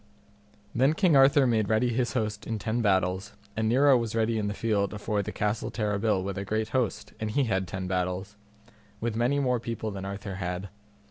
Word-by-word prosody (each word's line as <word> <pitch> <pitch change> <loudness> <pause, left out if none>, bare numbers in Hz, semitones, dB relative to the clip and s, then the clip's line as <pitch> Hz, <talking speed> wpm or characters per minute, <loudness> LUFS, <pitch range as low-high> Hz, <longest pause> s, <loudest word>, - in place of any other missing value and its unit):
Then 135 +6 +3
King 175 -4 +4
Arthur 135 +1 +6
made 110 -4 +1
ready 110 +3 +2
his 120 0 0
host 110 -3 -2
in 110 - -2
ten 110 +3 -1
battles 95 -2 +1 0.2
and 110 +1 0
Nero 135 +3 +5
was 115 -2 -1
ready 115 0 +1
in 105 - -1
the 105 - -3
field 105 -2 0
afore 105 0 -1
the - - -5
Castle 105 +1 -1
Terrabil 105 -2 0
with 100 0 -3
a - - -3
great 110 +2 -1
host, 110 -4 -1
and 110 - -2
he 140 +6 +1
had 95 -6 0
ten 95 +1 -4
battles, 90 +2 -2 0.6
with 115 -1 -2
many 120 +5 +2
more 125 -3 +1
people 110 -1 -4
than 95 -1 -6
Arthur 100 0 -5
had. 90 +1 -4
110 Hz, 200 wpm, -28 LUFS, 100-115 Hz, 0.6 s, Arthur